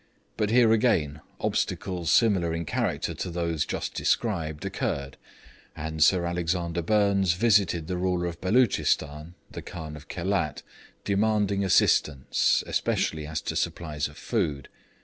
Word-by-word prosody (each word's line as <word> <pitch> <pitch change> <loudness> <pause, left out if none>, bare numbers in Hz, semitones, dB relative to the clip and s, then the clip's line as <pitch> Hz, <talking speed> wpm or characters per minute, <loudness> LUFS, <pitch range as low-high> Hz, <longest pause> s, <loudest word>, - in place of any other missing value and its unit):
But 105 - 0
here 115 -1 +5
again 85 - +1 0.2
obstacles 90 -3 -2
similar 95 -8 +3
in 85 0 -3
character - - -1
to 90 - -5
those 85 -3 -1
just - - -3
described 80 -10 -1
occurred, 70 -1 -3 0.6
and 80 0 -1
Sir 90 0 +4
Alexander 85 0 -1
Burnes 100 -1 +2
visited 95 -4 +2
the 90 +2 -3
ruler 90 -1 0
of 85 -1 -5
Beloochistan 90 - +1 0.2
(the - - -7
Khan 80 -3 -8
of 75 -1 -12
Khelat), 90 -4 -2 0.4
demanding 100 -1 +1
assistance, 75 -7 +2
especially 75 -2 -1
as 80 0 -3
to - - -4
supplies 75 -3 -2
of 75 - -15
food. 80 - -2
85 Hz, 130 wpm, -26 LUFS, 80-100 Hz, 0.6 s, here